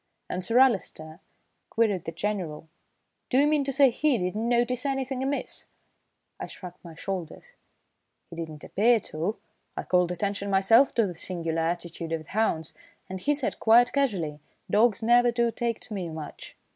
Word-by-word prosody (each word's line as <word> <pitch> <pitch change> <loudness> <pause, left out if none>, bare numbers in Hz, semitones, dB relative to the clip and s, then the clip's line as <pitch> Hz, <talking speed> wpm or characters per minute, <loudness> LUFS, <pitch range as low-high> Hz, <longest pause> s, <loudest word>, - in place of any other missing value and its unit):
"And 180 - -3
Sir 230 +6 +1
Alister?" 190 -11 +2 0.5
queried 210 -6 +1
the - - -3
General. 175 -6 -3 0.6
"Do 255 - +2
you 280 - +5
mean 295 -1 +2
to 275 - -1
say 270 -1 +5
he 285 +2 +2
did 180 0 -2
not 220 +2 -2
notice 240 +1 +1
anything 270 -2 -2
amiss?" 275 +1 -3 0.7
I - - -5
shrugged 180 -1 -11
my 170 -2 -11
shoulders. 190 - -6 0.8
"He - - -8
didn't 160 -2 -7
appear 230 +3 +3
to. 175 +3 -3 0.4
I - - -2
called 180 -1 +2
attention 200 +2 -2
myself 210 +7 +4
to 230 - +3
the 175 -4 -6
singular 165 -3 -2
attitude 170 0 -3
of 160 -1 -2
the - - -16
hounds, 160 -7 0 0.4
and 190 0 -6
he 295 0 +2
said 280 -3 -3
quite 240 +3 +5
casually: 190 - 0 0.3
'Dogs 225 +1 +3
never 240 +1 +5
do 235 0 +1
take 230 0 -2
to - - -9
me 185 -4 -3
much.'" 155 -2 -9
205 Hz, 170 wpm, -27 LUFS, 170-245 Hz, 0.8 s, you